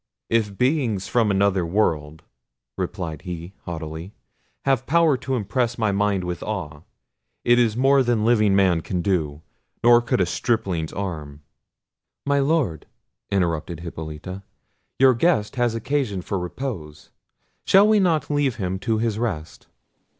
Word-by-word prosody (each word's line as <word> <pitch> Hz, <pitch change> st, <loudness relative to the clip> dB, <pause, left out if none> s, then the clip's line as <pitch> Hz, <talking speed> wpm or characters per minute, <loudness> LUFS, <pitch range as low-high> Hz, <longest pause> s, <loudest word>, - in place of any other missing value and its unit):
"If 105 Hz, -4 st, +1 dB
beings 125 Hz, -7 st, +1 dB
from 115 Hz, -3 st, +2 dB
another 100 Hz, -2 st, +2 dB
world," 80 Hz, -5 st, -1 dB, 0.5 s
replied 80 Hz, +2 st, -4 dB
he 90 Hz, 0 st, -7 dB
haughtily, 80 Hz, +2 st, -6 dB, 0.5 s
"have 135 Hz, -2 st, +1 dB
power 165 Hz, -1 st, +4 dB
to 130 Hz, +1 st, -3 dB
impress 120 Hz, +2 st, -1 dB
my 110 Hz, -3 st, +1 dB
mind 100 Hz, -1 st, +1 dB
with 90 Hz, -1 st, -4 dB
awe, 85 Hz, -9 st, -5 dB, 0.6 s
it 120 Hz, 0 st, +5 dB
is 115 Hz, -2 st, +2 dB
more 135 Hz, +2 st, +4 dB
than 120 Hz, -4 st, +1 dB
living 105 Hz, -4 st, +4 dB
man 95 Hz, -4 st, +3 dB
can 90 Hz, +1 st, -3 dB
do; 80 Hz, -6 st, -1 dB, 0.4 s
nor 120 Hz, 0 st, +7 dB
could 120 Hz, -, 0 dB
a 90 Hz, -, +3 dB
stripling's 90 Hz, -5 st, -1 dB
arm." 75 Hz, -7 st, -6 dB, 0.8 s
"My 140 Hz, 0 st, +2 dB
Lord," 140 Hz, -, 0 dB, 0.4 s
interrupted 85 Hz, -3 st, -1 dB
Hippolita, 80 Hz, +2 st, -7 dB, 0.6 s
"your 130 Hz, -1 st, +6 dB
guest 120 Hz, -4 st, +1 dB
has 120 Hz, -2 st, +1 dB
occasion 115 Hz, -5 st, -1 dB
for 100 Hz, -, -2 dB
repose: 90 Hz, -, -6 dB, 0.6 s
shall 195 Hz, +2 st, +6 dB
we 215 Hz, -1 st, +4 dB
not 165 Hz, -6 st, +1 dB
leave 145 Hz, -4 st, +1 dB
him 95 Hz, -4 st, -3 dB
to 110 Hz, +3 st, 0 dB
his 110 Hz, -1 st, -1 dB
rest?" 95 Hz, -10 st, -4 dB
100 Hz, 140 wpm, -23 LUFS, 85-120 Hz, 0.8 s, nor